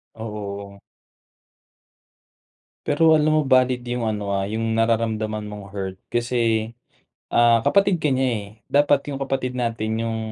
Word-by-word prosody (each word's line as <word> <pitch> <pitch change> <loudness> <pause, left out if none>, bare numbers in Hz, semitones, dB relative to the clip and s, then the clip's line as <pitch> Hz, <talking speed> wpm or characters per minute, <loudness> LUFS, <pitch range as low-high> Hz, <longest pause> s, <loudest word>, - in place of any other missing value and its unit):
Oo. 100 -2 -7 2.1
Pero 160 +2 +4
alam 155 0 +3
mo - - +3
valid 130 -1 +3
yung 120 -1 -2
ano, 105 -2 -2
ah 95 - 0
yung 110 +2 -2
nararamdaman 110 -2 0
mong 105 -2 -9
hurt 95 -2 -5
kasi, 115 -2 0 0.6
ah, 115 -1 +4
kapatid 200 +3 +3
ka 150 - +2
niya, 130 0 +1
eh. 100 -1 -5 0.2
Dapat 145 0 +3
yung 140 -1 -4
kapatid 130 -2 -2
natin 115 -2 -2
yung 115 -1 -2
115 Hz, 135 wpm, -22 LUFS, 105-130 Hz, 2.1 s, Pero